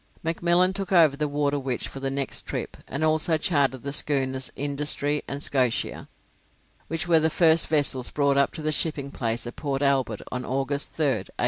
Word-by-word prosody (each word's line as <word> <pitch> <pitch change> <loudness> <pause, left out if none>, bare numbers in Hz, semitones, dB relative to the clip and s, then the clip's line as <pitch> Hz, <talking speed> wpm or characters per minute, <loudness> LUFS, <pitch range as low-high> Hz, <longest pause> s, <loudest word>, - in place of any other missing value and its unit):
McMillan 175 +3 +2
took 195 -1 -4
over 165 -6 +5
the 150 +1 -2
'Waterwitch' 140 -3 -2
for 135 - -8
the 135 0 -2
next 135 0 -3
trip, - - -5
and 140 +4 -4
also 155 +1 +3
chartered 140 -6 0
the 140 0 -4
schooners 135 -3 0
'Industry' 145 +1 -1
and 140 +1 -4
'Scotia', 125 -4 -1 0.8
which 165 +1 -3
were 165 -2 +5
the 160 +1 +2
first 165 0 +4
vessels 145 -5 +3
brought 140 -1 +1
up 140 0 +2
to 160 - -7
the 155 - 0
shipping 145 -2 0
place 115 -2 -2
at 120 - -8
Port 140 -1 -2
Albert 135 -6 0
on 125 0 -4
August, 135 +2 -2
3rd, 130 - 0
1842. - - -38
140 Hz, 185 wpm, -25 LUFS, 135-155 Hz, 0.8 s, over